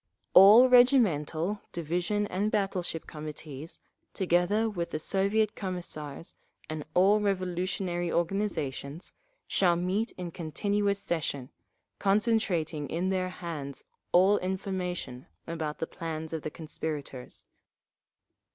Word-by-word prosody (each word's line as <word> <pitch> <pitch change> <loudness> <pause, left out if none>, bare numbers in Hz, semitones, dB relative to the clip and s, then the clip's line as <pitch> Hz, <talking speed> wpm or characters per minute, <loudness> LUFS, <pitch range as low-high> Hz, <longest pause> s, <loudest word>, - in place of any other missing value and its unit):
All 210 +7 +9
regimental, 210 - +4
division 175 +6 -1
and 205 +2 -1
battle 195 -3 0
ship 165 -2 -4
Committees, 150 0 -8 0.4
together 190 +4 +2
with 175 -6 -3
the - - -2
Soviet 200 +6 +1
Commissars, 170 -6 -5 0.3
and 155 -1 -4
all 195 +4 +5
revolutionary 185 -2 -1
organisations, 170 -4 -2 0.3
shall 175 -3 +3
meet 190 +6 -1
in 180 -2 -6
continuous 200 +6 0
session, 155 -9 -3 0.5
concentrating 195 -8 +1
in 175 +3 -1
their 185 -1 0
hands 160 -6 -6 0.3
all 190 +3 +5
information 185 -8 -4 0.2
about 160 -2 -4
the - - -2
plans 160 -1 -5
of 160 - -2
the 155 - -4
conspirators. 150 -4 -6
180 Hz, 105 wpm, -29 LUFS, 160-200 Hz, 0.5 s, All